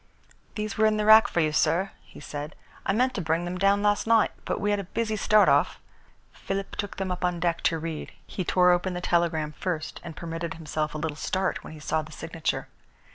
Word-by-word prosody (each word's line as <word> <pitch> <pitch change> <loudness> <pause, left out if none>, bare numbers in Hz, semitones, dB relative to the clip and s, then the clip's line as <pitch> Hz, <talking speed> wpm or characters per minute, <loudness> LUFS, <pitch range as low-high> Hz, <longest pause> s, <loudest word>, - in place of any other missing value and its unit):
"These 215 0 -4
were 220 - +6
in 215 0 +1
the 210 - 0
rack 220 +1 +8
for 170 - 0
you, 155 -1 +2
sir," 165 +5 +2
he - - -15
said. 150 +1 -6 0.3
"I - - +3
meant 250 +5 +2
to 200 - -3
bring 165 +1 0
them 180 +1 -4
down 200 +1 +3
last 205 +1 +2
night 225 -1 +4
but - - -2
we 205 +1 0
had 205 - +1
a - - -3
busy 220 +4 -2
start 215 0 +4
off." - - +3 0.5
Philip 195 0 -4
took 205 - -4
them 190 -1 -2
up 180 0 -4
on 180 -1 0
deck 170 0 0
to 165 - +3
read. 160 -1 -5
He 185 - -4
tore 180 +1 +4
open 180 +1 +1
the - - -2
telegram 165 -4 +1
first 160 -1 -4
and 160 - -8
permitted 165 -1 -4
himself 155 -1 -3
a - - -1
little 155 -1 -3
start 190 +3 -1
when - - -9
he 155 - -10
saw 155 +1 0
the 155 +1 -11
signature. 160 +1 -3
180 Hz, 230 wpm, -26 LUFS, 160-200 Hz, 0.5 s, rack